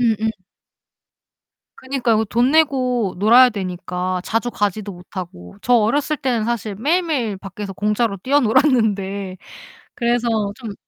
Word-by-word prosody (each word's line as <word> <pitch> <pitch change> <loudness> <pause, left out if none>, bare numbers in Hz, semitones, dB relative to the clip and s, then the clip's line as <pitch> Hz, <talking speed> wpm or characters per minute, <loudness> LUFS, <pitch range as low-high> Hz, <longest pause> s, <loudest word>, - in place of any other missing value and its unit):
음음. 220 -2 +1 1.5
그니까요. 245 -5 0
돈 240 +4 +2
내고 255 -9 +2
놀아야 240 +6 +7
되니까 185 -2 -3
자주 230 +2 -1
가지도 205 -1 -2
못하고. 175 - -9
저 245 - 0
어렸을 280 +7 +2
때는 250 -6 -1
사실 220 -3 -2
매일매일 290 - 0
밖에서 195 +1 -7
공짜로 210 +2 0
뛰어놀았는데 215 -7 +1 0.6
그래서 240 0 0 0.3
좀 225 -5 -7
220 Hz, 280 characters per minute, -20 LUFS, 195-250 Hz, 1.5 s, 놀아야